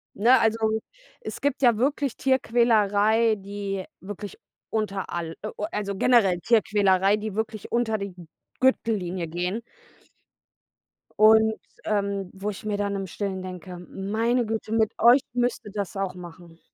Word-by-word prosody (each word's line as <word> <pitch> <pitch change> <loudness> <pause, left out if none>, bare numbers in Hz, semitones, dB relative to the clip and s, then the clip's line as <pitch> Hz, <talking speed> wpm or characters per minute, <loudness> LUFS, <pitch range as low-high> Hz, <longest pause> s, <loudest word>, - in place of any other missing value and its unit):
Ne, 240 +4 +5
also, 225 0 +2 0.6
es - - -7
gibt 285 -1 0
ja 240 -3 +5
wirklich 275 +1 0
Tierquälerei, 225 -3 +3
die 200 -1 -5 0.2
wirklich 205 0 -8 0.3
unter 205 -3 -2
all 165 -1 -4
äh, 215 - -4
äh, - - -5 0.2
also 200 -1 -3
generell 195 -5 +3
Tierquälerei, 205 -2 +3
die 215 -1 -5
wirklich 220 -1 -4
unter 235 -2 +1
die 200 -2 -5
G 175 -1 -12 0.4
Gürtellinie 190 -9 +1
gehen. 180 +7 -3 1.6
Und, 220 +1 +6 0.3
ähm, 200 -2 -1
wo 195 +2 -4
ich 205 0 -8
mir 210 -1 -1
dann 200 0 -1
im 195 -1 -3
Stillen 190 +1 -4
denke: 185 0 -8
„Meine 225 +5 0
Güte, 220 0 -4
mit 220 -1 +2
euch 245 +4 +7
müsste 245 -3 -1
das 200 -2 -4
auch 195 -2 -2
machen." 170 -1 -12
205 Hz, 145 wpm, -25 LUFS, 195-225 Hz, 1.6 s, euch